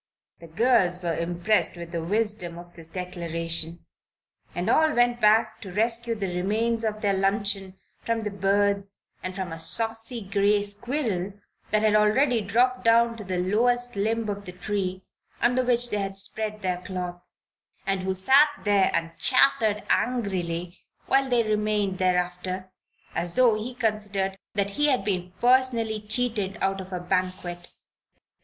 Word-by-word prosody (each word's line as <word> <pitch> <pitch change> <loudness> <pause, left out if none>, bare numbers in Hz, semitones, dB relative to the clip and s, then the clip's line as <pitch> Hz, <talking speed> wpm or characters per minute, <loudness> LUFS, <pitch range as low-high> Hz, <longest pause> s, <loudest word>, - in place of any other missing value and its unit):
The 170 - -12
girls 185 -1 +2
were 170 -2 0
impressed 175 +4 +1
with 170 -1 -8
the 170 -2 -3
wisdom 205 -2 -2
of 175 0 -12
this 165 -2 -8
declaration, 165 -2 -4 0.7
and - - -2
all 315 -1 +3
went 240 0 +2
back 220 +1 +3
to 195 - -8
rescue 230 +3 0
the 195 -4 -3
remains 220 +5 0
of 215 -1 -2
their 200 -2 +2
luncheon 195 0 -1 0.3
from 230 -1 -1
the 210 - -3
birds 200 0 0 0.2
and 185 0 -5
from 190 -3 -4
a 165 - -6
saucy 225 +6 0
gray 200 +1 +2
squirrel 205 -2 -2 0.4
that 215 0 +2
had 215 -1 +3
already 225 +4 +3
dropped 250 +5 +1
down 230 0 +4
to 215 - -7
the 185 -2 -3
lowest 245 +6 +1
limb 220 +2 0
of 205 -1 -4
the 180 - -8
tree 185 0 -3 0.4
under 250 +1 +2
which 245 -1 +2
they 210 - 0
had 195 -1 -4
spread 215 +1 -2
their 180 -1 -1
cloth, 180 -1 -5 0.6
and 195 -1 0
who 190 0 -1
sat 270 +11 +6
there 205 -2 +3
and 165 0 -2
chattered 225 -4 +3
angrily 180 -7 -1 0.3
while 270 0 +2
they 240 -2 +3
remained 210 -3 0
thereafter, 185 +1 -1 0.4
as 170 0 -1
though 250 -3 +5
he 225 +4 -4
considered 205 -4 -1 0.2
that 200 -1 0
he 295 +8 +1
had 260 -4 +1
been 180 -3 -2
personally 240 -4 +2
cheated 215 -3 -1
out 195 0 0
of 190 0 -11
a 180 - -3
banquet. 180 -1 -2
205 Hz, 155 wpm, -26 LUFS, 185-230 Hz, 0.7 s, sat